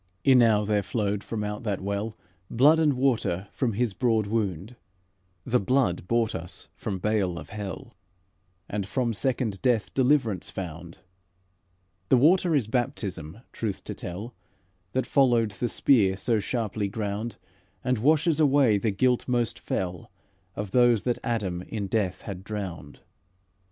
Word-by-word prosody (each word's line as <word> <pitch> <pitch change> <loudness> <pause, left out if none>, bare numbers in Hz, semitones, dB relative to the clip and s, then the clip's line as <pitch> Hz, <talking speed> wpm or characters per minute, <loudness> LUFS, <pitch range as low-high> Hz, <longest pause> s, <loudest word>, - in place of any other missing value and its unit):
"Enow 115 -6 +5
there 105 0 +1
flowed 100 0 -2
from 110 -2 -4
out 105 0 -4
that 105 -4 -2
well, 100 +3 -3 0.3
Blood 145 +7 +5
and 155 -3 +3
water 120 -8 0
from 125 -5 -1
His 115 0 0
broad 115 -2 +1
wound: 100 0 -2 0.7
The 125 - +2
blood 100 -6 +1
bought 115 0 +1
us 85 +2 -5
from 100 -3 -4
bale 95 -3 0
of - - -9
hell, 105 +3 -7 0.7
And 100 -2 -3
from 120 +1 0
second 120 -3 -1
death 120 -4 +1
deliverance 125 - +2
found. 85 -2 -7 1.1
The 130 - +6
water 170 +5 +4
is 135 -6 +2
baptism, 105 - -3
truth 105 -4 -4
to - - -5
tell, 100 +7 -7 0.6
That 130 -1 0
followed 120 -6 +3
the 120 +5 -3
spear 100 -7 +3
so 115 +1 +1
sharply 105 -2 -2
ground, 105 +2 -3 0.5
And 125 -2 +1
washes 155 +5 +3
away 140 -8 +4
the 110 - 0
guilt 125 +5 +1
most 120 -3 0
fell 90 -2 -3 0.5
Of 105 -2 -5
those 120 -3 +4
that 120 -1 0
Adam 100 -7 -2
in 105 +2 -4
death 95 -3 -1
had 95 -3 -7
drowned. 95 -8 -6
110 Hz, 145 wpm, -26 LUFS, 100-125 Hz, 1.1 s, The